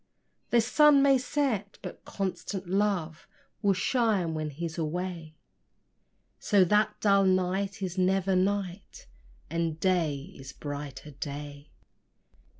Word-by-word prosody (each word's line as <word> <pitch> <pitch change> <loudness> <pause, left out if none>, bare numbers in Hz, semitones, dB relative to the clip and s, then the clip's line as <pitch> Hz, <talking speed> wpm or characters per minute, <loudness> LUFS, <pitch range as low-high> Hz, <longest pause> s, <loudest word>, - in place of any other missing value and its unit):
The 235 - +4
sun 285 +4 +5
may 275 -2 +5
set, 245 -7 -1
but - - -9
constant 195 -1 -4
love 185 -5 -1 0.3
Will 200 -2 +3
shine 205 -6 +1
when 155 -1 -3
he's 165 +3 -5
away; 165 0 -4 1.0
So 200 -3 +4
that 210 +3 +2
dull 200 -1 +4
night 190 +1 0
is 185 0 -3
never 190 +1 +2
night, 190 0 -2 0.5
And 165 -1 -1
day 165 -2 0
is 135 +1 -10
brighter 145 0 -7
day. 145 +1 -7
185 Hz, 115 wpm, -28 LUFS, 160-200 Hz, 1.0 s, sun